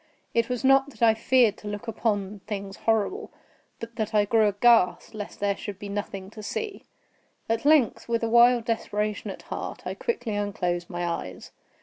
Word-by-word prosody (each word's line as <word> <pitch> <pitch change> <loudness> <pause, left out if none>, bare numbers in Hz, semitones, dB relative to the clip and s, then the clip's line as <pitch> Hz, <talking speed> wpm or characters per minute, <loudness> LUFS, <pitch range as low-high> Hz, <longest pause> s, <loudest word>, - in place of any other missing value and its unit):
It 230 0 +1
was 250 0 -2
not 270 +1 +5
that 260 - -5
I 225 -1 +7
feared 230 -1 +3
to 210 - -10
look 205 +2 -5
upon 210 -3 -1
things 200 -2 -5
horrible, 225 - 0 0.5
but 230 0 -9
that 220 -1 -2
I 205 -1 +4
grew 220 0 +3
aghast 205 -3 +3
lest 210 -2 -7
there 200 -1 +1
should 200 -1 -7
be 205 0 -8
nothing 200 -1 -5
to 220 - -10
see. 410 - -5 0.6
At 225 +3 -1
length, 290 -7 +3
with 230 0 0
a - - +2
wild 235 0 +5
desperation 215 -2 -2
at - - -8
heart, - - -6
I - - -3
quickly 360 - -3
unclosed 180 -4 -2
my 175 -2 -3
eyes. 130 - -5
215 Hz, 185 wpm, -26 LUFS, 200-235 Hz, 0.6 s, I